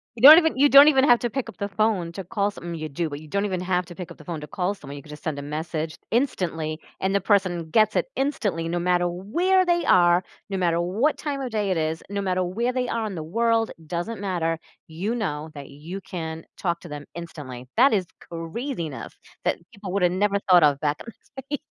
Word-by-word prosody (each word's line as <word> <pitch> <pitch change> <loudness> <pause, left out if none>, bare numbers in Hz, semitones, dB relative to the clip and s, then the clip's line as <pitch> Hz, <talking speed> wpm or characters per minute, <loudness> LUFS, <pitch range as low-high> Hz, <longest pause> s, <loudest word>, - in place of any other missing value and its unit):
You 225 - -9
don't 305 +3 +12
even 320 -5 0
you 285 +2 +6
don't 280 +2 +9
even 270 -3 +5
have 245 -4 +6
to 240 - -1
pick 265 +1 -3
up 205 - -12
the 200 - -2
phone 200 -4 0
to 195 +1 -6
call 200 +2 -1
some 185 -4 -11
well, 170 - -4
you 155 -1 -5
do, 165 +4 -2
but 145 - -6
you 155 - -12
don't 200 +6 -1
even 185 -3 -2
have 180 0 0
to 175 - -10
pick 180 -3 -7
up - - -11
the 150 - -15
phone 165 -3 -5
to 150 - -7
call 185 +3 -1
someone, 145 -8 -10
you 140 - -10
could 150 - -16
just 150 - -11
send 155 -3 -2
a - - -4
message, 155 +1 -4
instantly, 165 - -1 0.2
and 190 +1 0
the 200 - +2
person 185 -5 +1
gets 215 +4 +3
it - - +2
instantly 205 - -1
no 175 +1 -1
matter 175 0 +2
where 335 - +1
they 345 -1 +1
are, 175 0 +5 0.3
no 195 - -2
matter 170 -2 +1
what 215 - +1
time 285 -2 -3
of 255 -3 -4
day 210 -2 -1
it 185 - +1
is, 160 0 -1
no 200 0 -2
matter 185 -1 0
where 230 +8 -1
they 250 -1 -1
are 230 -2 -1
in 210 - -4
the 160 - -4
world, 225 +5 +1 0.2
doesn't 175 +8 -4
matter- 170 -4 -1 0.3
you 180 +8 -3
know 160 -10 -3
that 140 -2 -9
you 165 +8 -8
can 160 -3 -6
talk 170 -2 -1
to 175 - -10
them 145 -1 -7
instantly. 145 -7 -8
That 255 +1 +6
is 190 -4 +1
craziness 170 - -5 0.3
that - - +1
people 200 -2 -8
would've 180 -3 +2
never 200 +2 +1
thought 180 -3 +7
of 145 -2 +4
back 150 -1 -1
in 230 - -10 0.2
the 265 - -7
day. - - -36
180 Hz, 245 wpm, -24 LUFS, 165-220 Hz, 0.3 s, don't